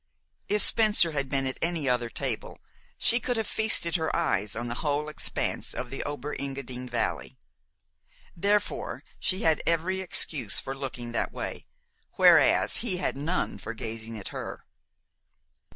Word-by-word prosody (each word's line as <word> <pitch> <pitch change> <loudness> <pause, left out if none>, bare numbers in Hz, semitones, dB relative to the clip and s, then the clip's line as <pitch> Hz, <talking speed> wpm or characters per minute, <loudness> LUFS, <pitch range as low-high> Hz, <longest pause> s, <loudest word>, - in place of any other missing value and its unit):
If 210 0 +5
Spencer 210 -6 +6
had 140 -3 -1
been 135 0 +1
at 130 - -2
any 165 -4 0
other 125 -2 +1
table, - - -3 0.4
she 235 - +3
could 245 -1 -1
have 225 - -1
feasted 200 -7 +2
her 160 -1 -1
eyes 105 - 0
on 120 +2 -3
the 120 - -3
whole 150 0 -1
expanse 155 - -3
of 125 0 -5
the 135 - -3
Ober 145 0 -4
Engadin 135 -2 -5
Valley. - - -2 1.0
Therefore 205 +4 -1 0.2
she 185 +1 0
had 160 -2 +3
every 175 +3 +1
excuse 145 - 0
for 135 - -5
looking 125 -3 -5
that 120 - -1
way, - - -6 0.5
whereas - - +5
he 210 -6 +2
had 180 - -2
none 150 +6 -2
for 110 - -6
gazing 115 0 -5
at 100 - -6
her. - - -7
145 Hz, 150 wpm, -27 LUFS, 125-180 Hz, 1.0 s, Spencer